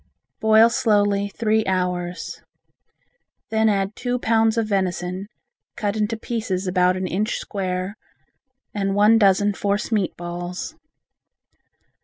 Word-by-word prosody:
Boil 220 +1 +5
slowly 205 -4 +2
three 220 +1 +1
hours. 180 -1 -2 1.1
Then 220 0 +3
add 195 0 0
two 245 0 -2
pounds 225 -1 +2
of 225 - +2
venison, 185 -1 -2 0.5
cut 210 -3 -2
into 215 +1 -1
pieces 215 -5 -3
about 180 0 +2
an 185 - -2
inch 205 +5 -1
square 185 -1 -3 0.8
and 195 -1 -1
one 210 +2 +5
dozen 205 0 +4
force 200 +3 -1
meat 205 -5 0
balls. 175 - -5
200 Hz, 115 wpm, -22 LUFS, 185-220 Hz, 1.1 s, Boil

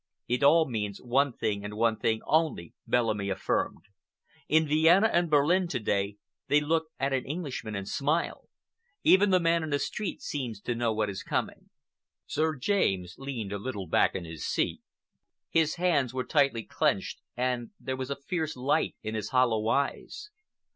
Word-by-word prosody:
"It 125 +2 0
all 160 +3 +5
means 105 -5 -3
one 135 +3 +2
thing 100 -3 -2
and 105 0 -6
one 115 0 +3
thing 110 0 0
only," 155 - 0
Bellamy 110 -5 +1
affirmed. 95 - -1 0.7
"In 160 0 +4
Vienna 165 +7 +5
and 175 -1 +2
Berlin 160 +5 +3
to 125 - -2
day 100 -1 -1 0.3
they 145 - +4
look 160 +2 0
at 135 +1 0
an 130 -1 0
Englishman 140 -8 -4
and 100 -1 -4
smile. 150 +8 -1 0.5
Even 195 +2 +6
the 185 -1 +4
man 165 0 +2
in 160 - -4
the 145 - +1
street 200 +6 -4
seems 125 -8 -4
to 120 - -2
know 115 -1 0
what 105 -1 0
is 95 - -6
coming." - - -3 0.6
Sir 155 +2 0
James 95 - 0
leaned 120 -7 -4
a 100 - -3
little 105 -4 -4
back 85 - +2
in 90 -3 -4
his 80 -2 -8
seat. - - -1 0.7
His 160 -2 +2
hands 145 -8 +1
were 130 - -1
tightly 140 -7 +2
clenched, - - -1 0.2
and 125 -2 -1
there 130 - -3
was 130 0 -5
a 140 - -1
fierce 155 +1 -3
light 130 +3 +1
in 110 0 -4
his 110 -2 -3
hollow 120 -4 +2
eyes. 140 - -2
130 Hz, 175 wpm, -28 LUFS, 110-155 Hz, 0.7 s, Even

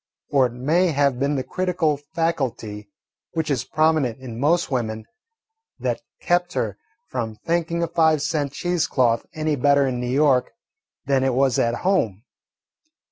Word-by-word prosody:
Or 135 -3 +4
it 120 - -11
may 155 +9 +2
have 140 -5 +1
been 140 +2 +1
the 130 - -1
critical 175 +1 0
faculty, 140 -9 -3 0.4
which 160 -2 -1
is 130 -4 0
prominent 155 -7 +1
in 120 -3 -8
most 165 +4 +2
women, 110 -4 -2 0.7
that - - -2 0.2
kept 175 0 +1
her 115 -7 -1 0.4
from 115 -4 -3
thinking 170 0 0
a - - 0
five 160 -3 +2
cent 150 -3 -1
cheese 175 +3 -1
cloth 120 -4 +1
any 155 -1 0
better 140 +1 +3
in 125 -2 -2
New 125 0 -3
York 135 -2 +3 0.5
than 135 -1 +2
it 135 -2 +1
was 135 -1 +2
at 115 0 +1
home. 115 - +1
140 Hz, 155 wpm, -23 LUFS, 125-160 Hz, 0.7 s, Or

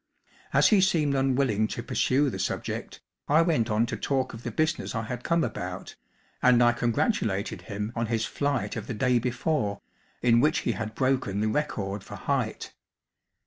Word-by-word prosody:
As - - +5
he 210 -3 +5
seemed 160 -7 +2
unwilling 130 -5 +2
to 120 - -5
pursue 135 +1 +1
the 95 - -5
subject, 95 - -3 0.3
I 155 +3 +5
went 155 -9 +1
on 110 +2 +2
to 120 - -4
talk 135 -2 -1
of 115 - -8
the 120 - -4
business 155 +3 -1
I 115 - -1
had 125 +2 -5
come 170 0 +2
about, - - -5 0.5
and 125 -1 +5
I 120 - +6
congratulated 115 - 0
him 105 +2 -4
on 115 -1 -1
his 115 0 0
flight 135 -8 -1
of - - -5
the 120 - -4
day 125 +2 +2
before 120 -3 -1 0.4
in 120 -1 +5
which 150 +5 +2
he - - 0
had 110 -1 -5
broken 130 -7 0
the 110 +1 +1
record 105 -7 -2
for - - -9
height. - - -2
120 Hz, 180 wpm, -27 LUFS, 110-140 Hz, 0.5 s, I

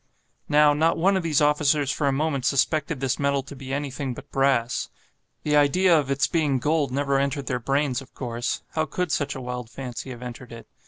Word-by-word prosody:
Now, 150 0 +5
not 160 +3 +2
one 195 +4 +3
of 190 - +1
these 160 -3 +1
officers 150 -1 +2
for 150 -1 -1
a - - +3
moment 140 -1 -1
suspected 145 +2 +1
this 135 0 0
metal 140 -1 +1
to 140 +1 -10
be 135 0 -8
anything 140 -2 -3
but 145 - -12
brass. 135 -3 +1 0.5
The 150 0 +1
idea 170 +5 +4
of 145 -4 +1
its 140 +1 +2
being 150 -5 +1
gold 145 +1 0
never 140 0 +1
entered 140 0 -1
their 125 -2 -1
brains, 135 +1 0
of 135 - -16
course; 120 -1 -3
how 155 0 0
could 180 +2 -2
such 140 -3 -1
a 135 - -6
wild 125 -2 -5
fancy 125 +1 -7
have 125 -1 -8
entered 125 0 -8
it? 115 0 -10
140 Hz, 210 wpm, -25 LUFS, 130-150 Hz, 0.5 s, Now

